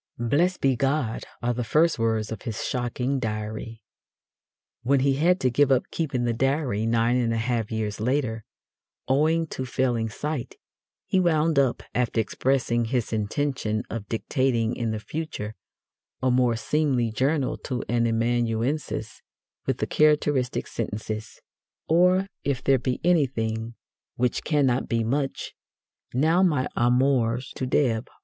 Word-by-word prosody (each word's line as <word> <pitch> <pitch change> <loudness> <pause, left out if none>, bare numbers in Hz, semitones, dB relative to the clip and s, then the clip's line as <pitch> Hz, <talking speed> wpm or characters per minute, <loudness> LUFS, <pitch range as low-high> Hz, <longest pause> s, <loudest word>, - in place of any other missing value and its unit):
"Blessed 145 +10 +1
be 135 -1 +3
God" 135 -3 -1 0.2
are 120 0 +1
the 120 +1 -2
first 155 +5 +2
words 110 -1 0
of 110 - -5
his 110 -4 -4
shocking 125 +2 -1
Diary. 110 0 -4 1.0
When 135 +2 +2
he 135 0 +3
had 180 +5 +3
to 130 - +2
give 140 +2 +3
up 130 -1 +3
keeping 135 -7 -1
the 120 -1 +1
Diary 130 -3 0
nine 115 +2 +2
and 120 -2 +1
a 115 - 0
half 115 -1 -1
years 110 -2 -2
later, 115 -1 -1 0.6
owing 160 +5 +2
to 130 - -4
failing 120 -3 0
sight, 145 +4 -4 0.5
he 190 - +2
wound 160 -4 +3
up, 130 -3 +1
after 120 -2 0
expressing 120 +1 +1
his 120 -1 -1
intention 110 0 -1
of 105 -3 -5
dictating 115 0 0
in 115 -2 -2
the 110 - -2
future 125 -5 -5 0.7
a 130 -1 +1
more 125 -1 +3
seemly 130 -2 0
journal 135 +4 0
to 125 -1 -4
an 120 0 +1
amanuensis, 115 +4 -1 0.5
with - - +1
the - - -1
characteristic 145 -4 +2
sentences: 110 0 -5 0.5
Or, 180 +3 +4 0.2
if 130 -3 -1
there 135 -1 +4
be 125 +1 -2
anything, 115 -9 +1 0.4
which 125 0 0
cannot 135 -5 +1
be 115 -1 +1
much, 135 +4 -2 0.6
now 160 +8 +3
my 150 -9 +2
amours 125 0 +2
to 130 - -3
Deb. 125 -3 +1
125 Hz, 140 wpm, -25 LUFS, 115-140 Hz, 1.0 s, Or